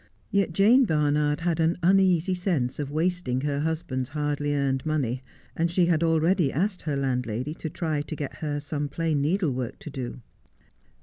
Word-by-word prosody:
Yet 200 -4 +2
Jane 220 +9 +5
Barnard 150 -3 +1
had 170 -1 0
an 165 +1 +2
uneasy 185 -1 +4
sense 175 -10 -1
of 145 -1 -3
casting 160 -5 0
her 140 0 -1
husband's 155 -5 -2
hardly 145 0 -1
earned 135 -2 0
money, 135 -5 -1 0.3
and 170 +1 +1
she 175 +1 +3
had 170 -2 +2
already 165 -1 +3
asked 185 +5 -1
her 150 -3 -2
landlady 125 0 -1
to 160 - -6
try 155 -2 -2
to 155 +2 -6
get 145 -2 -5
her 145 -2 -2
some 145 0 -3
plain 160 -1 0
needle 165 0 +1
work 125 -2 -4
to 170 -6 -9
do. 125 -2 -6
155 Hz, 175 wpm, -26 LUFS, 140-170 Hz, 0.3 s, Jane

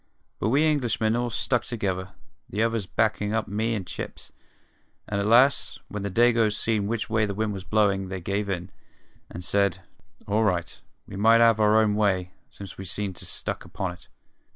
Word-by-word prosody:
But 105 - 0
we 140 +6 +3
Englishmen 120 -7 +1
all 120 0 0
stuck 120 +2 0
together, 95 -5 -3 0.4
the 105 +3 0
others 115 -4 -1
backin' 105 +1 0
up 110 - -1
me 110 +3 -1
and 100 -4 -4
Chips; 90 - -7 0.8
and 100 - -2
at 100 - -1
last, 125 +5 +4
when 105 - -5
the 100 - -3
Dagoes 115 0 +3
seen 110 -3 0
which 115 0 -2
way 110 -1 +1
the 100 - -4
wind 110 0 -1
was 95 -2 -6
blowin', 95 -1 +1
they 95 0 -4
give 100 +3 -2
in, 90 0 -3 0.6
and 90 - -7
said, 100 -1 +1 0.4
all 105 +2 +2
right, 90 -3 -1 0.2
we 95 - -9
might 115 +3 +5
'ave 115 -2 +5
our 105 +1 +5
own 110 -1 +3
way, 95 -4 +1 0.2
since 100 -2 -10
we - - -5
seemed 95 +1 -3
so - - -3
stuck - - -4
upon 95 -2 -4
it. 90 - -14
105 Hz, 190 wpm, -26 LUFS, 95-115 Hz, 0.8 s, might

